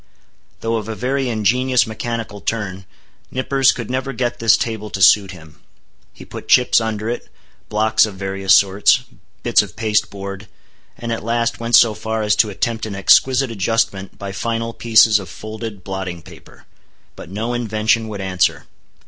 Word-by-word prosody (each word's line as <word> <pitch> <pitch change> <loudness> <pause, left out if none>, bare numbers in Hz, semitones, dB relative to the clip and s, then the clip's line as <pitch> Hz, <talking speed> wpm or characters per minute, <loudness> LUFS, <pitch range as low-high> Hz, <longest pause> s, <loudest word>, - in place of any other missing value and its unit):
Though 115 0 -1
of 110 0 -6
a 110 - -4
very 130 +2 -1
ingenious 125 +4 +2
mechanical 110 -2 -5
turn, 95 -4 -4 0.4
Nippers 135 +1 +2
could 120 -1 -6
never 130 +1 -2
get 120 0 -2
this 115 -1 +4
table 110 -2 -4
to 95 - -5
suit 95 +1 +5
him. 80 -5 -13 0.5
He - - -14
put - - -10
chips 125 -2 +4
under 110 -1 -3
it, 120 +1 -4 0.4
blocks 110 +1 +3
of 105 - -9
various 95 0 -2
sorts, 100 +1 +3 0.4
bits - - +4
of - - -9
pasteboard, 100 -2 -2 0.5
and 115 -1 -5
at 115 - -3
last 115 +1 -1
went 115 0 +2
so 115 -2 +6
far 110 +1 -3
as 105 - +2
to 110 - +3
attempt 110 +3 -2
an 100 - -6
exquisite 130 +6 +3
adjustment 100 -2 -1
by 100 -1 -6
final 115 +3 -3
pieces 110 -2 +4
of 95 -3 -9
folded 110 -1 -8
blotting 95 -3 -5
paper. - - -16 0.5
But - - -11
no 110 +5 -3
invention 110 -1 0
would 105 -2 -6
answer. 95 -3 0
110 Hz, 165 wpm, -19 LUFS, 100-115 Hz, 0.5 s, so